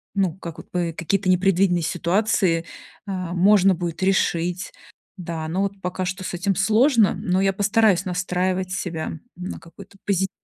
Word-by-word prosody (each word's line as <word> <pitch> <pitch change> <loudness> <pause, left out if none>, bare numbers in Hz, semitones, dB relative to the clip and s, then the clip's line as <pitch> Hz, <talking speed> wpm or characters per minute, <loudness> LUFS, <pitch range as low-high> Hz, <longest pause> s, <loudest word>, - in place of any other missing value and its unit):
ну, 190 -4 +1
как 170 -2 -8
вот, - - -12
п 175 -2 -1
какие-то 185 +4 -1
непредвиденные 185 -1 +3
ситуации, 175 -1 +1 0.4
а, 185 -3 -4
можно 195 +1 +5
будет 170 0 -4
решить. 180 -1 0 0.5
Да, 165 -3 -5
но 185 +5 -1
вот 200 -1 -4
пока 180 +1 -3
что 185 +1 -4
с - - -5
этим 190 +2 0
сложно, 220 +3 +4
но 185 +1 0
я 195 0 +3
постараюсь 205 -2 +3
настраивать 185 0 -1
себя 165 -4 -3 0.2
на 180 +1 -6
какой-то 170 +4 -15
позитив 190 -1 +1
185 Hz, 155 wpm, -23 LUFS, 175-195 Hz, 0.5 s, можно